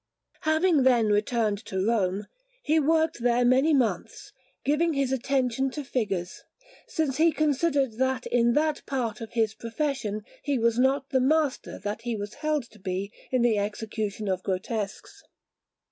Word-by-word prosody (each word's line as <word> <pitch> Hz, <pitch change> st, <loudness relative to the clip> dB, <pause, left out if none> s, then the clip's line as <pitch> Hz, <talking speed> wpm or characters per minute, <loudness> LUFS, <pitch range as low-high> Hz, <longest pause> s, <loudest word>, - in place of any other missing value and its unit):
Having 315 Hz, 0 st, +3 dB
then 245 Hz, -4 st, +4 dB
returned 210 Hz, 0 st, +1 dB
to 190 Hz, -, -5 dB
Rome, 205 Hz, -3 st, +1 dB, 0.4 s
he 315 Hz, +1 st, +3 dB
worked 320 Hz, 0 st, +2 dB
there 245 Hz, 0 st, +3 dB
many 260 Hz, +6 st, +4 dB
months, 260 Hz, -6 st, -1 dB, 0.3 s
giving 310 Hz, +4 st, +2 dB
his 275 Hz, -2 st, 0 dB
attention 265 Hz, 0 st, 0 dB
to 295 Hz, +3 st, -5 dB
figures, 200 Hz, -9 st, -3 dB, 0.5 s
since 300 Hz, -5 st, -1 dB
he 330 Hz, +1 st, +5 dB
considered 285 Hz, -5 st, +1 dB
that 260 Hz, -1 st, 0 dB
in 235 Hz, -1 st, +2 dB
that 300 Hz, +1 st, +1 dB
part 235 Hz, -6 st, -2 dB
of 225 Hz, +1 st, -8 dB
his 220 Hz, -2 st, +1 dB
profession 230 Hz, -3 st, -3 dB, 0.2 s
he 285 Hz, -2 st, 0 dB
was 230 Hz, 0 st, +2 dB
not 270 Hz, +1 st, +2 dB
the 260 Hz, -, +3 dB
master 300 Hz, +1 st, +1 dB
that 210 Hz, +2 st, -4 dB
he 240 Hz, -1 st, -2 dB
was 205 Hz, +1 st, -5 dB
held 305 Hz, -3 st, 0 dB
to 215 Hz, -, -17 dB
be 190 Hz, +2 st, -3 dB, 0.2 s
in 255 Hz, -2 st, +1 dB
the 225 Hz, -3 st, +3 dB
execution 210 Hz, 0 st, -3 dB
of 185 Hz, -1 st, 0 dB
grotesques. 195 Hz, +2 st, -4 dB
245 Hz, 155 wpm, -27 LUFS, 215-280 Hz, 0.5 s, he